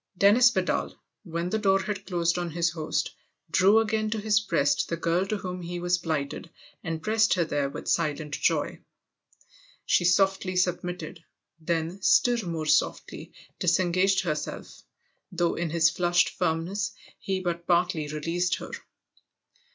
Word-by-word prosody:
VI 190 - -41
DENNIS 245 +4 +6
VIDAL, 190 -6 -1 0.3
when 170 +1 -3
the 220 - 0
door 195 -2 +3
had 200 -1 -5
closed 170 -1 0
on 175 -1 -3
his 170 +1 0
host, 160 -2 -2 0.4
drew 195 +5 +5
again 220 -1 +1
to 220 0 -2
his 215 0 +2
breast 150 -9 0
the 170 - -2
girl 170 +3 0
to 215 - -1
whom 180 -2 -6
he 175 +1 -5
was 175 0 +1
plighted 160 -1 -3 0.3
and 165 -1 -4
pressed 220 -1 +3
her 175 -2 +1
there 145 -3 -1
with - - -8
silent 155 -2 -1
joy. - - 0 1.1
She - - +3
softly 190 +1 +2
submitted, 180 -2 -2 0.4
then 165 +3 -2
still 240 -1 +3
more 160 -2 -3
softly - - 0 0.3
dis 175 0 +2
engaged 185 +2 +2
herself, 155 -4 -5 0.5
though 175 -1 0
in 170 -1 -2
his 165 +1 +3
flushed 175 0 +2
firmness 185 +7 -2 0.3
he 190 -1 -2
but 170 -2 -4
partly 175 -3 +1
released 165 +4 -1
her. - - -8
175 Hz, 150 wpm, -27 LUFS, 165-195 Hz, 1.1 s, DENNIS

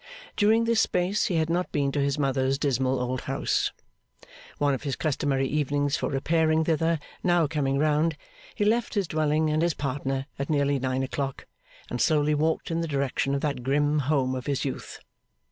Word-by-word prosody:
During 220 +2 +4
this 230 -1 +3
space 180 +3 +1
he 180 - -1
had 160 -1 +2
not 175 +2 -1
been 140 -1 0
to 145 - -1
his 140 +1 0
mother's 135 -1 +1
dismal 130 -2 0
old 125 +1 -2
house. 135 +1 0 0.9
One 145 -1 +2
of 135 - -3
his 140 -3 -2
customary 135 -3 0
evenings 145 -1 0
for - - -2
repairing 160 +3 +2
thither 165 +1 +1 0.3
now 175 -2 +3
coming 140 -3 0
round, 155 +2 +2 0.4
he 205 - 0
left 230 +2 +1
his 200 -4 +1
dwelling 155 0 +1
and 155 +1 +1
his 170 -2 +1
partner 135 -1 -2
at 140 - -3
nearly 140 -2 +2
nine 130 0 -1
o'clock, 135 0 -4 0.4
and 120 - -3
slowly 150 -1 +3
walked 160 +3 0
in 165 0 0
the 165 - -2
direction 140 -1 0
of 140 - -2
that 145 -4 -2
grim 145 +3 +1
home 135 -2 +1
of 130 -1 -5
his 140 0 -1
youth. 135 - -5
145 Hz, 185 wpm, -26 LUFS, 135-160 Hz, 0.9 s, During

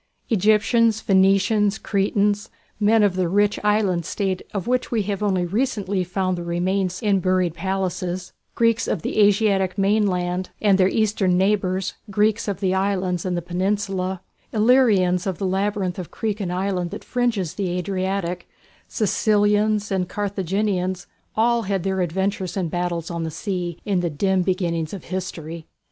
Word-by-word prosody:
Egyptians, 220 +2 +3
Phoenicians, 195 +1 +3
Cretans, 205 0 0 0.3
men 215 +1 +4
of 200 -3 +2
the 185 -2 0
rich 205 +2 +2
island 205 -5 +2
state 190 +2 -2
of 195 -3 -3
which 250 +1 0
we 225 -3 0
have 200 0 -3
only 190 -4 +1
recently 200 -2 -1
found 185 +1 -1
the - - -5
remains 180 +2 -1
in 200 -2 +3
buried 185 -2 +1
palaces, 185 -1 -3 0.2
Greeks 230 -1 +2
of 175 - -2
the - - -1
Asiatic 200 -2 +3
mainland, 185 -3 +1
and 200 -2 +3
their 185 - +5
Eastern 205 -5 +1
neighbours, 190 -1 +1 0.2
Greeks 215 +2 +1
of 200 0 -3
the 190 -1 +1
islands 190 -2 0
and 180 -1 -1
the 175 - -3
Peninsula, 190 +1 -2 0.3
Illyrians 210 -6 +3
of 185 -3 -2
the 195 - -3
labyrinth 190 -1 -1
of 180 - -6
creek 215 -2 -3
and 185 -4 -3
island 180 -1 -1
that - - -7
fringes 235 -9 -1
the 195 -3 -2
Adriatic, 185 -1 -2 0.4
Sicilians 210 -1 +1
and 185 -2 0
Carthaginians, 190 -2 -1 0.3
all 235 +1 +3
had 195 -4 -2
their 190 -1 0
adventures 190 +1 -2
and 175 -4 -2
battles 175 -1 -2
on 170 -1 -3
the 165 - -2
sea, 175 0 -4
in 195 -3 +1
the 175 -1 0
dim 190 +5 +1
beginnings 175 -3 -1
of 190 - -9
history. 170 -3 -6
190 Hz, 155 wpm, -22 LUFS, 180-205 Hz, 0.4 s, their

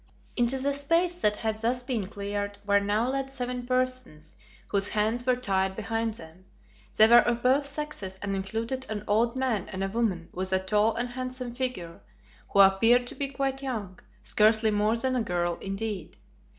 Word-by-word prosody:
Into 240 +2 +2
the 280 +2 0
space 335 +5 +1
that 210 0 +3
had 220 0 -2
thus 245 +2 -1
been 240 -7 -2
cleared 205 0 -4
were 200 0 +4
now 205 +4 0
led 270 +1 -2
seven 250 -2 -4
persons, 255 -11 -1 0.4
whose 200 0 +2
hands 220 +4 0
were 255 - +4
tied 190 -5 0
behind 225 +1 -2
them. 165 0 -14 0.5
They 215 - +9
were 235 +1 +8
of 240 0 0
both 265 +3 +3
sexes 280 -12 -4
and 200 -1 -2
included 225 +7 -3
an 210 -2 -4
old 230 +4 +2
man 255 -7 -1
and 190 -1 -4
a - - 0
woman 195 -6 -1
with 185 +1 -3
a - - +5
tall 210 +3 +1
and 240 +2 -2
handsome 255 -1 -5
figure, 240 -10 -4 0.5
who 200 - +5
appeared 225 +6 +5
to - - -4
be 275 +1 -2
quite 270 0 -2
young, 215 -9 -5 0.2
scarcely 215 +1 +3
more 210 +2 +1
than 255 +2 0
a 250 - +1
girl 175 -4 -1
indeed. 195 -3 -5
225 Hz, 180 wpm, -27 LUFS, 200-255 Hz, 0.5 s, They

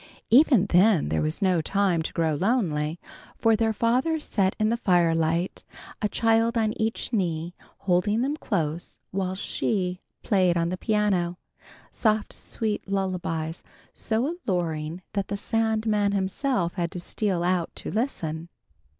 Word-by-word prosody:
Even 255 - +6
then 185 - +4
there 80 - 0
was 155 +6 -1
no 180 -3 +3
time 190 0 +1
to 160 - -4
grow 160 -2 +1
lonely, 165 - 0 0.4
for 225 -1 +4
their 220 0 +1
father 250 +9 +1
sat 195 -9 0
in 215 0 +2
the 230 - +2
firelight, 170 -3 +1 0.4
a 210 - +1
child 225 +2 +2
on 220 -1 +1
each 225 +2 -2
knee, 170 -4 -1 0.3
holding 205 +5 +2
them 285 +3 0
close 165 - -3
while 190 -1 -2
She 185 -2 -2 0.2
played 185 -4 +3
on 170 0 +1
the 185 - -2
piano, 190 -5 0 0.5
soft 215 -1 0
sweet 215 -3 -3
lullabies 180 -4 -2 0.3
so 225 +2 -1 0.2
alluring 165 -2 -2
that 200 -1 -1
the 200 - -3
Sandman 220 -2 +1
himself 195 0 0
had 170 -2 -2
to 180 - -4
steal 180 0 -1
out 180 -1 +1
to - - -6
listen. 170 - -2
190 Hz, 140 wpm, -26 LUFS, 170-220 Hz, 0.5 s, Even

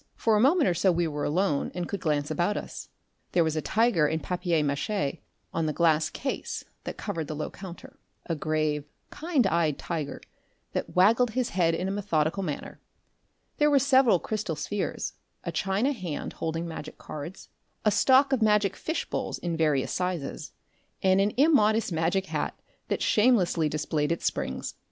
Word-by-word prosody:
For 225 -1 +2
a - - +3
moment 300 - +4
or 180 - +3
so 180 +3 +3
we 170 0 +1
were 150 -1 -3
alone 165 -2 0
and 175 -1 -3
could 200 - -3
glance 150 -3 0
about 180 +4 0
us. - - -7 0.4
There 175 - +4
was 160 -1 -1
a 155 - 0
tiger 215 -6 +3
in 160 +2 -1
papier 175 -2 0
mache 145 +2 -1 0.3
on 165 -1 0
the 155 - -1
glass 160 -2 +3
case 270 - -4 0.2
that - - -5
covered 170 -7 -4
the 155 - -4
low 150 - -4
counter 185 -3 -10 0.3
a 165 - -2
grave, 155 -1 0 0.3
kind 310 -7 +1
eyed 165 -5 +1
tiger 150 -5 -4 0.5
that - - -4
waggled 225 +5 +4
his 255 -2 +1
head 165 -3 +2
in 180 +3 -2
a - - -1
methodical 190 -3 0
manner; 155 -7 -5 0.8
there 295 0 +5
were 285 - +5
several 260 -6 +5
crystal 200 -3 -3
spheres, 155 +8 -3 0.3
a - - -3
china 195 +8 +1
hand 185 - -4
holding 165 +1 -3
magic 160 -2 -7
cards, 155 +5 -8 0.4
a 210 - +5
stock 265 +6 +5
of 255 - +1
magic 210 -2 +3
fish 320 - -3
bowls - - -3
in 170 -1 -3
various 150 -5 +1
sizes, 180 -6 -3 0.5
and 190 0 +4
an 205 +1 +2
immodest 225 - +4
magic 170 +4 +1
hat - - -3 0.3
that - - -1
shamelessly 195 -9 +3
displayed 150 0 -1
its 170 - -2
springs. 65 - -2
175 Hz, 175 wpm, -27 LUFS, 155-210 Hz, 0.8 s, there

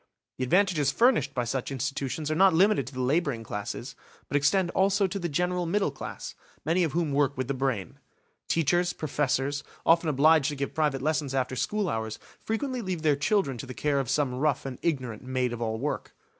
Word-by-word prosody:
The - - 0
advantages 170 -3 +3
furnished 230 - +3
by 125 - +1
such 125 +3 -3
institutions 135 +3 -3
are - - +1
not 190 0 +5
limited 200 +5 +3
to - - -8
the 130 - -2
labouring 140 -3 0
classes, 105 -1 -5 0.3
but - - -4
extend 175 +6 +2
also 195 +1 +2
to 195 +1 -3
the 175 -2 -2
general 180 +3 0
middle 195 -2 +1
class, 135 - -7 0.3
many 170 +4 +2
of 160 - -1
whom 165 -3 0
work 140 -1 +1
with 130 -1 -2
the 140 - -1
brain. 130 -7 -2 0.5
Teachers, 175 +3 +2
professors, 140 -1 -1 0.2
often 165 0 +4
obliged 150 +1 +4
to 145 - -4
give 140 0 -3
private 150 -4 0
lessons 150 -3 0
after 130 -1 0
school 210 - -1
hours, 110 -5 -3 0.3
frequently 250 +3 -2
leave 185 -6 -3
their 150 -2 +4
children 145 - 0
to 135 - -6
the 130 - -7
care 145 -2 +1
of 130 -4 -2
some 145 -4 +1
rough 140 +3 0
and 130 -2 -6
ignorant 130 -9 -2
maid 130 -1 -1
of 120 - -6
all 110 -1 -1
work. 145 +6 -4
145 Hz, 200 wpm, -27 LUFS, 130-175 Hz, 0.5 s, not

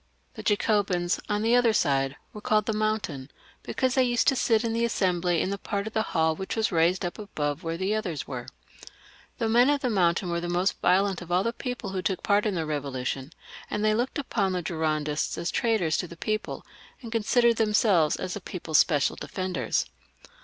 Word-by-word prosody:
Jlie - - -8
Jacobins, 200 -4 +1
on 210 0 0
the 230 +2 +4
other 240 -2 +4
side, 135 -6 +1 0.2
were 210 - -8
called 215 0 +2
the 220 - -1
Moun 215 0 +1
tain, 135 -6 -7 0.3
because 260 -1 -1
they 260 - +4
used 240 -1 +1
to 270 - +1
sit 230 -3 +2
in 230 -1 -1
the 230 +1 0
Assembly 180 -6 +1
in 195 - 0
a 200 - -5
part 200 -1 -3
of 220 - -6
the 220 - +1
hall 160 -6 +1
which 190 +4 -4
was 220 -1 0
raised 175 +2 +2
up 175 - -5
above 150 -7 -3
where 165 -2 -3
the 190 +3 0
others 180 -8 -3
were. 125 -3 -6 0.9
The 230 - 0
men 240 +4 +5
of 290 -1 +2
the 250 - 0
Mountain 175 -2 +1
were 170 0 -1
the 175 - -4
most 180 +2 0
violent 190 +1 +2
of 175 0 -9
all 180 +2 +3
the 230 - -1
people 245 -5 -5
who 190 -1 -2
took 190 0 -2
part 205 +1 +2
in 205 - -1
the 165 - 0
Eevolution, 140 -2 -3 0.4
and 210 +1 -1
they 215 - +4
looked 240 +4 -1
upon 210 -9 -1
the 180 -1 -2
Girondists 155 -2 -1
as 170 - -2
traitors 210 -9 +1
to 180 - -2
the 170 - -12
people, 215 +4 -3 0.4
and 230 - -7
consi 230 +2 +2
dered 235 -1 +4
themselves 210 -7 +3
as 185 -1 -4
the 205 - -6
people's 165 -4 0
special 145 -4 +2
defenders. 185 - -2
190 Hz, 215 wpm, -27 LUFS, 165-220 Hz, 0.9 s, men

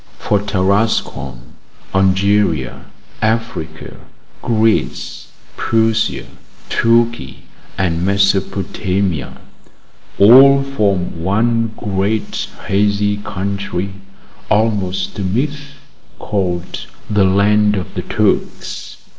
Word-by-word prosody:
For 105 - 0
Tarascon, 100 - -1 0.4
Algeria, 95 -6 +1 0.4
Africa, 110 -8 -3 0.4
Greece, 110 -1 0 0.3
Persia, 110 0 +1 0.4
Turkey, 115 - +1 0.3
and 85 -3 0
Mesopotamia, 95 -3 0 0.8
all 135 +6 +7
form 100 -11 -1
one 115 +4 +1
great 105 +1 -2 0.2
hazy 105 +1 +1
country, 100 -1 -4 0.6
almost 100 -3 0
a - - -1
myth, 140 +9 -2 0.4
called 90 -4 -3 0.2
the 105 -2 +2
land 105 +2 +3
of 95 -2 -5
the - - -3
Turks. - - -2
100 Hz, 75 wpm, -17 LUFS, 95-110 Hz, 0.8 s, all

